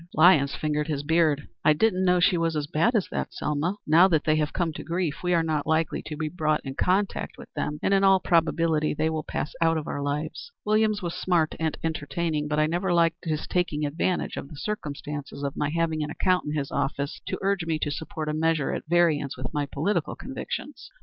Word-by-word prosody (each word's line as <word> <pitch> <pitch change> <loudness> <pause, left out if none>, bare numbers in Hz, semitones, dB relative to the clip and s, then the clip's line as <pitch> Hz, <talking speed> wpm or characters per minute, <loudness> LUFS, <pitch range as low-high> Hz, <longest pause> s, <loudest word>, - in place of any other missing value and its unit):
Lyons 155 -4 +5
fingered 150 -1 -1
his 145 -3 -2
beard. 155 -2 +2 0.2
"I 155 - +6
didn't 190 +2 +2
know 180 -1 +4
she 180 +1 +4
was 165 -1 0
as 150 -1 -1
bad 165 - +1
as 205 - +2
that, - - -3
Selma. 150 +6 -1
Now 165 +5 +6
that 160 -5 +2
they 155 -1 +3
have 150 -1 0
come 170 -3 -1
to - - -7
grief, 170 -3 -2
we 180 - 0
are 165 - +3
not 155 -3 -1
likely 160 0 +1
to 150 - -5
be 155 +1 -2
brought 155 -2 0
in 135 - -4
contact 190 +7 0
with - - -13
them, 150 - -2
and 195 - +2
in 195 0 +4
all 195 -1 +6
probability 165 -3 +2
they 160 +1 +1
will 155 -1 -1
pass 150 - -4
out 165 -1 +3
of 155 - -3
our 145 - -4
lives. 150 - -3
Williams 215 -1 +2
was 170 -1 -2
smart 170 -4 +1
and 160 -1 -1
entertaining, 160 -1 -2
but 150 0 -1
I 155 - +4
never 175 +4 -1
liked 170 0 +2
his 155 -2 -2
taking 160 -4 0
advantage 165 +5 -1
of 140 - -6
the - - -10
circumstances 145 -6 -5
of 140 -1 -2
my 145 - 0
having 160 0 0
an 150 - -4
account 185 +3 +1
in 150 - -3
his 145 -2 -2
office 140 +1 -2
to - - -2
urge 195 -4 0
me 160 -1 +1
to 145 - -2
support 155 +1 -5
a 150 - -1
measure 160 -2 +1
at - - -5
variance 160 -6 +2
with 130 +2 -6
my 145 -2 -1
political 160 +11 -1
convictions." - - -6
160 Hz, 225 wpm, -26 LUFS, 150-175 Hz, 0.2 s, I